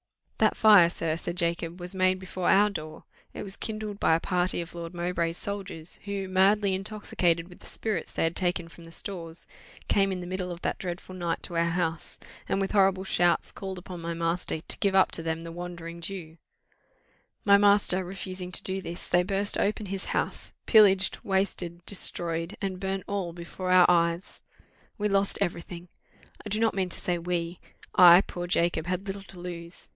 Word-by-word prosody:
"That - - +3
fire, 205 -6 +7
sir," 165 -2 -2
said 170 0 -5
Jacob, 170 0 -1
"was 180 +1 -1
made 185 0 +2
before 185 -1 -3
our 205 +1 +5
door: 155 -4 -7 0.3
it - - -6
was 195 -1 -6
kindled 215 -2 -4
by 160 - +4
a - - +1
party 180 0 0
of 170 0 -6
Lord 170 0 -7
Mowbray's 170 -1 -1
soldiers, 195 -5 -4
who, 200 -1 -3
madly 195 +2 +3
intoxicated 185 -4 -1
with 180 - -15
the - - -11
spirits 215 -6 -2
they - - -1
had 165 +1 0
taken 175 -2 0
from 165 0 -14
the 165 - -13
stores, 170 -2 -6 0.4
came 195 -1 +3
in 185 - -3
the 180 - -6
middle 185 0 -4
of 175 0 -8
that - - -1
dreadful 180 0 -6
night 170 -2 -3
to - - -5
our 165 0 +3
house, 170 -1 -2 0.3
and - - +1
with 195 - -1
horrible 190 -2 +3
shouts, 175 -2 +2
called 190 -1 -6
upon 180 -1 -8
my 170 0 -3
master 165 -1 -2
to - - -5
give 195 -1 +1
up 190 - +5
to - - -1
them 160 0 -2
the 165 0 -7
Wandering 170 -1 -7
Jew. 165 -3 -6 1.1
My 200 -1 +7
master 200 -2 +5
refusing 185 0 -5
to - - +3
do 190 0 -1
this, 175 -1 -6
they 175 - +4
burst 195 +2 0
open 210 +1 0
his 195 0 -4
house, - - -3
pillaged, 195 -4 +5
wasted, 180 -3 -1
destroyed, 170 -1 0
and 190 -2 -3
burnt 190 0 -2
all 195 -4 -3
before 175 +2 -6
our 180 -1 +7
eyes! 170 +1 +1 0.6
We 210 -1 0
lost 195 0 +1
every 175 -3 -1
thing! 175 0 -10 0.5
I 210 - -6
do 210 +2 -1
not 225 0 +2
mean 190 -2 -1
to - - -5
say 175 -1 -1
we 170 0 -3 0.3
I, 175 0 +9
poor 175 -2 -6
Jacob, 170 -2 +1
had 185 +2 -2
little 195 0 -5
to 195 -2 -13
lose. 175 -1 -8
180 Hz, 195 wpm, -27 LUFS, 170-195 Hz, 1.1 s, I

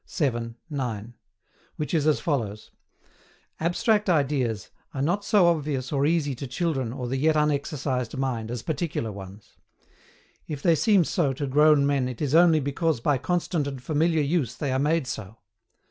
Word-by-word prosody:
vii. 120 -7 -1 0.2
9) 120 -5 -4 0.6
which 150 +1 -4
is 155 -2 +2
as 155 - +3
follows: 110 -9 -3 0.9
"ABSTRACT 205 +5 +1
IDEAS 135 - 0 0.2
are 135 - -2
not 180 +7 0
so 200 -3 +4
obvious 145 -6 0
or 140 0 +2
easy 155 -4 +1
to 135 +2 -6
children 135 -3 -1
or 125 -1 -5
the 130 +2 -2
yet 155 +3 +2
unexercised 140 -4 -1
mind 125 -5 -2
as 120 -1 -4
particular 155 -8 -2
ones. 100 +1 -11 0.9
If 145 -3 -6
they 170 - +5
seem 185 +5 +4
so 150 -4 0
to 140 +2 -3
grown 150 +1 +4
men 140 -3 +1
it 125 - -7
is 145 -2 -1
only 165 -1 +6
because 145 +1 -1
by 140 +2 +1
constant 170 -2 -1
and 135 -2 -5
familiar 155 +4 +1
use 140 -6 0
they 140 +2 -2
are 130 - +1
made 155 +1 +1
so. 110 -3 -6
140 Hz, 165 wpm, -25 LUFS, 125-160 Hz, 0.9 s, only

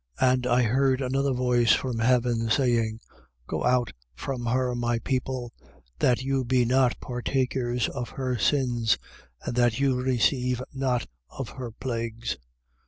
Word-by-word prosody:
18:4. 130 -1 +5
And 125 -1 -1
I 125 0 +3
heard 130 +3 +2
another 135 +1 0
voice 125 -2 +3
from 125 -3 -1
heaven, 120 -1 +2
saying: 115 -3 +1 0.4
Go - - -3
out 125 -1 +2 0.2
from 125 - -4
her, 125 +1 +1
my 120 -1 0
people; 125 0 -3 0.5
that 125 +1 +2
you 135 0 0
be 125 0 +2
not 125 0 +2
partakers 125 -1 -1
of 125 -1 -5
her 130 -2 -2
sins 120 -3 +2 0.5
and - - -3
that 120 -1 +3
you 135 -2 +2
receive 125 0 +1
not 130 -3 0 0.2
of 135 -4 -6
her 125 -3 -6
plagues. 115 -1 -4
125 Hz, 145 wpm, -26 LUFS, 120-130 Hz, 0.5 s, 18:4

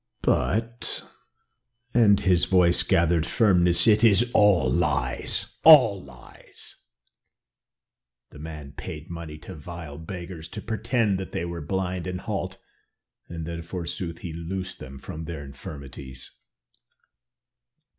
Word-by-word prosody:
"But 115 +3 0 0.5
" 120 0 -47
and 105 -4 +5
his 90 -2 +3
voice 90 -2 +4
gathered 85 -3 +2
firmness, 90 -6 +3
"it 110 0 +4
is 115 +2 +5
all 100 -10 +4
lies 70 -4 0
all 130 -11 +8
lies. 65 -3 -14 1.5
The 75 - -13
man 75 -2 -8
paid 75 +3 -8
money 85 -2 -7
to 75 - -10
vile 80 -1 -9
beggars 85 -1 -7
to - - -7
pretend 110 -3 0
that 95 - -7
they 85 - -2
were 85 -1 -5
blind 95 +2 -3
and 90 0 -4
halt, - - -4 0.7
then, 85 0 -5
forsooth, 85 0 -5
he 85 - -5
loosed 90 +3 -5
them 70 +1 -9
from 80 +3 -8
their 80 -4 -6
infirmities." 70 -2 -9
85 Hz, 120 wpm, -25 LUFS, 80-95 Hz, 1.5 s, all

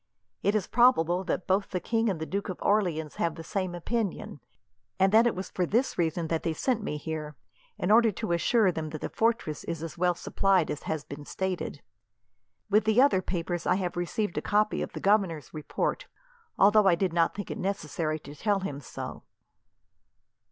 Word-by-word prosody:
It 205 - +1
is 205 -4 +1
probable 190 -8 +3
that 180 - -2
both 195 +2 +1
the 180 - -2
king 225 +3 0
and 185 -5 -2
the 160 - -3
Duke 200 +4 -3
of 185 - -4
Orleans 175 -7 +1
have 165 -2 0
the 165 - -8
same 185 0 -3
opinion, 210 +3 -3 0.6
and 190 0 +4
that 225 +3 +6
it 235 - 0
was 185 +1 -6
for 185 - -1
this 230 +9 +1
reason 165 0 0
that 165 0 -1
they 165 - -1
sent 240 +6 0
me 150 -8 -3
here, 150 -1 -5 0.4
in 180 - 0
order 230 0 +6
to 220 0 -4
assure 190 +4 +3
them 160 -2 -4
that 155 0 -7
the - - -3
fortress 225 -10 0
is 165 -1 -4
as 165 +1 -7
well 180 0 +2
supplied 190 -1 +1
as 150 - -4
has 155 -2 -2
been 145 +1 -9
stated. 185 -2 -4 0.8
With 210 +1 +3
the 220 +2 +3
other 255 -9 +5
papers, 175 -1 -3
I 180 - +4
have 185 -2 -2
received 175 +3 -2
a - - -7
copy 210 +1 +1
of - - -4
the - - -5
governor's 190 - +1
report, 155 -2 -2 0.5
although 205 +1 +6
I 180 - +6
did 180 -1 -1
not 170 -1 +2
think 205 -1 -5
it - - -5
necessary 165 -5 -2
to 145 - -10
tell 200 +5 0
him 145 -7 -4
so." - - -7
185 Hz, 200 wpm, -28 LUFS, 165-210 Hz, 0.8 s, that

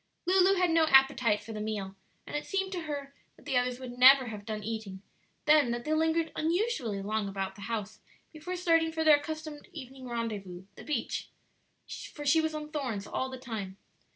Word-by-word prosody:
Lulu 375 +1 +5
had 360 -2 +2
no 325 -1 +4
appetite 265 -6 +4
for 225 - -8
the 210 - -5
meal, 205 -3 -4 0.3
and - - -7
it 295 - -3
seemed 385 -1 -1
to 350 -4 -4
her 285 -2 -5 0.2
that - - -21
the 275 -3 -2
others 250 0 +1
would 250 -1 -8
never 260 -1 +8
have 210 -1 -8
done 215 -1 -4
eating; 210 -3 -5 0.4
then 300 -4 +5
that 240 0 -3
they 310 - 0
lingered 320 +1 +1
unusually 315 - -1
long 210 0 -1
about 195 -1 -3
the 200 - -13
house 215 -1 -4 0.3
before 315 +4 -5
starting 330 -2 +2
for 320 0 -1
their 305 -2 +7
accustomed 310 0 -7
evening 265 -3 -9
rendezvous 210 -7 -4
the - - -12
beach; 285 -6 -3 0.8
for 295 - -7
she 320 +3 +5
was 315 0 -2
on 300 0 -6
thorns 250 -10 -3
all 260 - -2
the 260 - -7
time. 215 -6 -6
265 Hz, 195 wpm, -30 LUFS, 220-315 Hz, 0.8 s, never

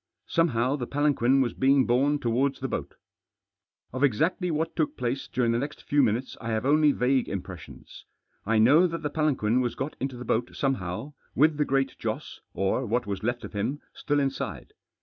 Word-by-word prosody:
Somehow 140 -5 +1
the 125 -3 -4
palanquin 135 -2 +2
was 120 -3 0
being 135 0 +3
borne 135 +5 +2
towards 130 +1 0
the 135 - -2
boat. - - -5 1.0
Of 130 +2 -2
exactly 160 - +1
what 160 0 -2
took 155 -3 -1
place 125 +2 -2
during 120 -2 0
the 115 - +1
next 145 +3 -5
few 145 0 +2
minutes 120 +1 0
I 115 - -4
have 110 +2 -1
only 150 +1 +4
vague 130 -1 +1
impressions. 95 -2 -8 0.4
I 110 +2 +1
know 145 +11 +6
that 165 -1 -5
the 150 - -2
palanquin 130 -7 +1
was 120 -2 -2
got 150 - -4
into 130 -1 -3
the 125 - -7
boat 115 +1 -1
somehow, 135 0 -2 0.2
with 155 +2 +4
the 150 - +2
Great 135 -1 0
Joss, - - -5
or 95 +7 0
what 120 +3 0
was 100 -1 -4
left 120 +2 -2
of - - -8
him, 115 +8 -2
still 145 -1 -1
inside. 135 -1 -3
130 Hz, 190 wpm, -27 LUFS, 120-145 Hz, 1.0 s, know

